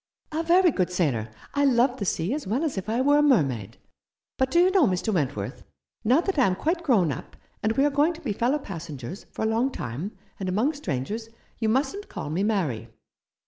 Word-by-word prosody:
"A 315 +1 -1
very 350 +1 +5
good 185 -8 0
sailor. 135 -12 0 0.2
I 285 - +2
love 255 -1 +3
the 200 - -3
sea 180 +4 0
as 295 -5 -4
well 240 - 0
as 315 - -1
if 190 +2 -4
I 235 +3 +1
were 290 +2 +4
a - - +5
mermaid. 140 - +2 0.6
But 260 0 +2
do 340 - +3
you 365 +2 +5
know, 370 -8 +5
Mr. 190 +3 0
Wentworth, 145 -6 -2 0.4
now 250 +8 +4
that 375 -4 -1
I 260 - +5
am 185 - +1
quite 335 - -1
grown 215 - +3
up, - - -7 0.3
and 220 +1 +1
we 270 +5 +3
are 290 - +2
going 295 +5 +3
to 330 - -12
be 225 -7 -2
fellow 245 +8 +1
passengers 170 - -7
for - - -4
a - - +2
long 230 +4 +2
time, 150 - -5 0.2
and 190 -2 -2
among 225 +11 +1
strangers, 220 - -4 0.3
you 220 -2 +1
mustn't 275 - 0
call 145 - -5
me 170 +5 0
Mary." 160 - 0
225 Hz, 220 wpm, -26 LUFS, 180-285 Hz, 0.6 s, very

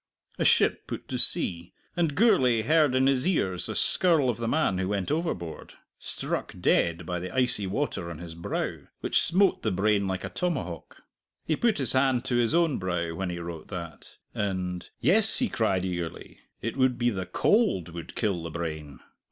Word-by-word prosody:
A - - +1
ship - - +3
put - - -7
to - - -3
sea, 85 -1 +4 0.2
and 165 -5 0
Gourlay 130 - +3
heard 150 0 +3
in 130 0 +3
his 135 +1 +2
ears 95 - +1
the - - -4
skirl 160 -8 +4
of - - -8
the 115 -1 -3
man 120 -9 +1
who 95 - -1
went 100 +3 -2
overboard 150 - -4 0.2
struck - - -4
dead 85 0 +1
by 90 +1 -3
the 90 +1 -6
icy 125 -6 +2
water 95 -5 -3
on 85 - -7
his 85 0 -8
brow, 85 +1 -4 0.2
which - - +1
smote 190 +3 +2
the 110 - -1
brain 100 +1 +1
like 95 -1 -3
a - - -4
tomahawk. 135 - -4 0.4
He 155 - 0
put 230 +5 +1
his 135 -5 +2
hand 130 -2 +1
to 125 -2 0
his 120 +5 +2
own 170 -5 +2
brow 90 -3 -2
when 95 +2 -4
he 90 - -4
wrote 85 -2 -7
that, 85 -4 -9 0.2
and, 95 -3 -3
"Yes," 220 +2 +5
he 250 -3 +1
cried 95 -5 0
eagerly, 85 -3 -6 0.2
"it 115 - -3
would 130 -2 +2
be 120 0 +1
the 95 -3 -5
cold 205 - +1
would 85 -1 -9
kill 100 -6 -1
the 85 - -6
brain! 80 -5 -6
105 Hz, 190 wpm, -27 LUFS, 90-140 Hz, 0.4 s, Yes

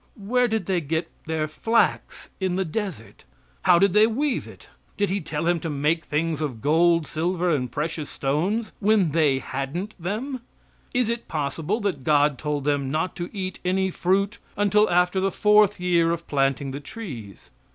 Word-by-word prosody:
Where 245 +5 +1
did 220 -1 -1
they 185 -3 0
get 160 +2 -2 0.2
their 160 -1 -1
flax 225 +9 0
in 185 -2 0
the 190 0 0
desert? 175 - -5 0.4
How 180 -1 +7
did 195 +1 +3
they 215 +1 +6
weave 265 +4 -1
it? - - -14 0.3
Did 205 -2 +1
He 200 - -1
tell 155 0 -3
him 175 0 +2
to 165 - -4
make 150 +3 0
things 155 +1 -1
of 135 -7 -3
gold, 165 +4 +3
silver 175 +3 -1
and 125 -6 -1
precious 155 +2 -3
stones, 180 +12 -1
when 205 -5 +3
they 150 -4 +3
hadn't 140 +11 -4
them? 235 +9 -3 0.5
Is 245 -2 +1
it 235 0 -3
possible 155 - -2
that 185 -10 -2
God 145 -1 +3
told 150 -2 -2
them 140 -2 0
not 155 +5 -1
to 175 -1 -4
eat 190 -3 -5
any 190 +1 +1
fruit 195 +4 0 0.2
until 210 +1 +3
after 180 +2 +2
the 195 +1 +1
fourth 210 +1 +4
year 175 -2 +2
of 170 0 -2
planting 135 -1 0
the 140 - -5
trees? 135 - -9
170 Hz, 175 wpm, -24 LUFS, 150-200 Hz, 0.5 s, How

